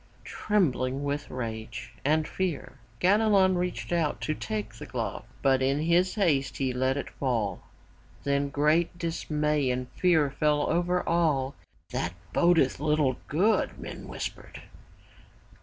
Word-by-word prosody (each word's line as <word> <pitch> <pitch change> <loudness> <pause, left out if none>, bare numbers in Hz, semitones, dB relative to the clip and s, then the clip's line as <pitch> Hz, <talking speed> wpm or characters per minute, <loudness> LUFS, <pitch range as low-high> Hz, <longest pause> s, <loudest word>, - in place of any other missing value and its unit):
Trembling 140 -10 0
with 145 +1 -2
rage 115 -1 -6
and 155 +2 +2
fear 170 -7 -3 0.2
Ganelon 195 -1 +4
reached 180 0 -3
out 165 -4 +1
to 155 - -1
take 110 -4 -4
the - - -9
glove, - - -4 0.2
but 135 -1 +4
in 135 +2 +2
his 175 +3 +2
haste 150 - +1
he 130 -2 0
let 130 +2 +1
it 140 - -3
fall. 115 -8 -1 0.6
Then 140 0 +1
great 155 +5 +2
dismay 150 -4 0
and 125 0 -1
fear 160 -6 +3
fell 150 0 +1
over 175 +2 0
all. 150 -6 +2 0.4
''That 85 - -1 0.2
bodeth 170 -8 +3
little 150 -3 +1
good,'' 195 +9 +1
men - - -8
whispered. - - -7
150 Hz, 130 wpm, -28 LUFS, 130-170 Hz, 0.6 s, Ganelon